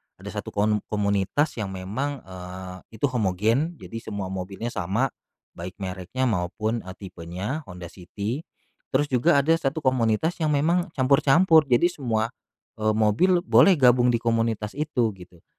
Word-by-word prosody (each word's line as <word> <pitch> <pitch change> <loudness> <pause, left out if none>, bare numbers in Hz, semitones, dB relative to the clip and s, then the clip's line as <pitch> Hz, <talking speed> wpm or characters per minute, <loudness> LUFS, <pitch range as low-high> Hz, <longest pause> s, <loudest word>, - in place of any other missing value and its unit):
ada - - -9
satu - - -6
kon 105 +1 +1
komunitas 100 +8 0
yang 100 - -3
memang, 110 +10 -4
eee, 90 0 -8 0.2
itu 110 - +1
homogen, 120 - 0
jadi 115 -4 -8
semua 100 -4 -5
mobilnya 95 +5 -5
sama, 115 +9 -1 0.4
baik 90 +2 -8
mereknya, 95 +6 -3
maupun, 110 +2 -1
eee, 95 0 -9
tipenya, 95 - -5
Honda 90 -1 -8
City. 100 - -5 0.5
Terus 140 +3 +2
juga 140 +6 +4
ada 160 +4 +4
satu 155 -3 -1
komunitas, 130 +6 +1
yang 155 - +2
memang 170 +5 +2
campur-campur. 145 +4 +4
Jadi 135 +8 +3
semua, 115 -7 -1 0.5
eee, 110 0 +1
mobil 170 - +3
boleh 195 0 +6
gabung 125 -3 +5
di 120 - +3
komunitas 115 -2 0
itu, 135 -6 0
gitu. 90 -1 -15
115 Hz, 145 wpm, -25 LUFS, 95-140 Hz, 0.5 s, boleh